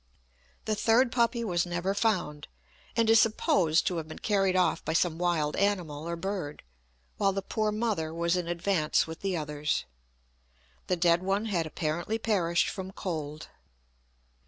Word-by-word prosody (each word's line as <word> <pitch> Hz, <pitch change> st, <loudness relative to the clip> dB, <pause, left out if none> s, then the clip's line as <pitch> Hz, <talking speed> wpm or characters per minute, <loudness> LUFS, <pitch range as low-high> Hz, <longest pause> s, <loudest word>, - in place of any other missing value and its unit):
The 215 Hz, -, 0 dB
third 230 Hz, +4 st, +3 dB
puppy 235 Hz, -1 st, +1 dB
was 175 Hz, -6 st, +1 dB
never 175 Hz, +2 st, -1 dB
found, 185 Hz, -9 st, -1 dB, 0.5 s
and 230 Hz, -1 st, +2 dB
is 225 Hz, 0 st, +7 dB
supposed 180 Hz, -7 st, +2 dB
to 180 Hz, -, 0 dB
have 160 Hz, -1 st, -4 dB
been 155 Hz, -, -9 dB
carried 195 Hz, -3 st, +1 dB
off 180 Hz, -3 st, +2 dB
by 160 Hz, -, -2 dB
some 165 Hz, -1 st, +1 dB
wild 170 Hz, -4 st, +1 dB
animal 170 Hz, -6 st, -1 dB
or 170 Hz, -, -2 dB
bird, 180 Hz, -4 st, -4 dB, 0.5 s
while 195 Hz, -1 st, +2 dB
the 195 Hz, 0 st, -3 dB
poor 215 Hz, +2 st, -1 dB
mother 210 Hz, -8 st, -1 dB
was 170 Hz, +1 st, 0 dB
in 180 Hz, -2 st, -2 dB
advance 170 Hz, -2 st, +1 dB
with 160 Hz, 0 st, -8 dB
the 195 Hz, -3 st, -1 dB
others. 150 Hz, -1 st, -2 dB, 1.0 s
The 180 Hz, -, +2 dB
dead 170 Hz, 0 st, +3 dB
one 195 Hz, +3 st, 0 dB
had 175 Hz, -7 st, -1 dB
apparently 165 Hz, +7 st, -2 dB
perished 180 Hz, -7 st, +1 dB
from 190 Hz, -1 st, -5 dB
cold. 155 Hz, -5 st, -5 dB
180 Hz, 160 wpm, -29 LUFS, 165-205 Hz, 1.0 s, is